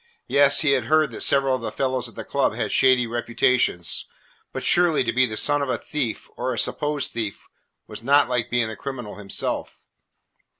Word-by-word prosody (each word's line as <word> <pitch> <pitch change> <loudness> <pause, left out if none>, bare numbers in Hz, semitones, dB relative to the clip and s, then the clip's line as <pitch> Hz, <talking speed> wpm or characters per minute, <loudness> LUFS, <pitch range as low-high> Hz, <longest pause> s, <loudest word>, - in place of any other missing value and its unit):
Yes, 140 0 +4
he 150 - +2
had 130 -4 +1
heard 155 0 +2
that - - -7
several 135 -1 +3
of 130 - -2
the - - -4
fellows 130 -3 -2
at 115 - -19
the - - -6
club - - 0
had - - -2
shady 130 -2 +4
reputations, 120 -6 0 0.4
but - - -5
surely 175 -5 +3
to 115 -2 -2
be 130 +1 +3
the 110 -2 -6
son 145 +4 +2
of 140 - -2
a - - 0
thief 140 -7 -4
or 130 +1 -2
a 120 - -4
supposed 150 -1 -1
thief 110 -4 -5 0.4
was - - -10
not 140 +4 +4
like 125 -2 -1
being 120 -2 +1
the 110 - -6
criminal 125 -6 -7
himself. 100 -2 -4
130 Hz, 200 wpm, -23 LUFS, 115-140 Hz, 0.4 s, Yes